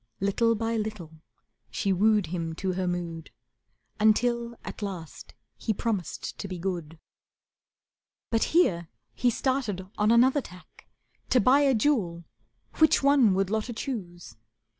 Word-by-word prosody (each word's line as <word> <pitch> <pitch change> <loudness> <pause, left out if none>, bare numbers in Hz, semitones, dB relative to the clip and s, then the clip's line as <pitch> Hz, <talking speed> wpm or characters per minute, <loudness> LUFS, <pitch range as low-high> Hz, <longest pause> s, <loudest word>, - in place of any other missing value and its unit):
Little 230 +4 +2
by 225 +1 -1
little 185 -8 -6 0.5
she 195 -2 0
wooed 210 +1 +3
him 165 -1 -4
to 190 +2 -2
her 185 0 -2
mood 170 -2 -4 0.7
Until 235 +2 +2
at - - -8
last 185 -6 -7 0.2
he 220 - -2
promised 205 -5 -3
to 200 - -4
be 185 -2 -6
good. 170 -3 -4 1.3
But 225 -1 +2
here 175 - +2 0.3
he 245 - +1
started 230 -7 -1
on 210 +1 +3
another 255 +5 +4
tack; 180 -7 -15 0.4
To 255 - +4
buy 255 +6 +5
a 275 -3 +3
jewel, 210 -9 0 0.6
which 315 -3 +4
one 275 -8 +5
would 195 0 0
Lotta 220 +2 -1
choose. 175 - -6
210 Hz, 135 wpm, -27 LUFS, 175-235 Hz, 1.3 s, buy